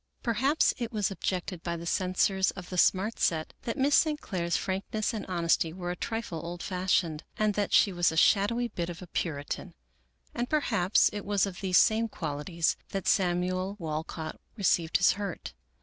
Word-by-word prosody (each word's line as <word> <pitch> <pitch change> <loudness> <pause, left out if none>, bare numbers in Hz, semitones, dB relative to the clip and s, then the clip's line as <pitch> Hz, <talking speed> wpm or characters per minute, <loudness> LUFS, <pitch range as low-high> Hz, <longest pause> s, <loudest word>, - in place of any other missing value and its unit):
Perhaps 265 +6 +2
it 235 -1 -3
was 210 -3 0
objected 185 -2 -3
by 170 0 -3
the 170 - -8
censors 185 +2 +1
of 180 -2 -7
the 180 - -4
Smart 195 +6 +2
Set 160 -2 0
that 230 - -2
Miss 280 +2 +2
St. 305 0 +4
Clair's 170 - -1
frankness 200 +4 -2
and 215 -3 -5
honesty 170 -2 +1
were 175 -1 -4
a - - -3
trifle 225 -6 -4
old 175 +1 -6
fashioned, 180 -4 0
and 215 -1 +2
that 205 0 -1
she 200 - +5
was 175 -1 +2
a 160 - -4
shadowy 225 +7 +3
bit 175 -4 -4
of 175 +1 -7
a - - -7
Puritan; 150 -4 -4 0.6
and 240 +1 -2
perhaps 215 -11 +3
it 205 -1 -4
was 205 -1 +1
of 190 -3 -7
these 185 -2 +3
same 225 +1 +4
qualities 160 0 -1
that 195 -2 -4
Samuel 185 +1 +1
Wal 155 -4 -3
cott 160 -1 -7 0.2
received 170 -5 +2
his 180 - +5
hurt. 200 -3 -5
185 Hz, 180 wpm, -29 LUFS, 170-210 Hz, 0.6 s, she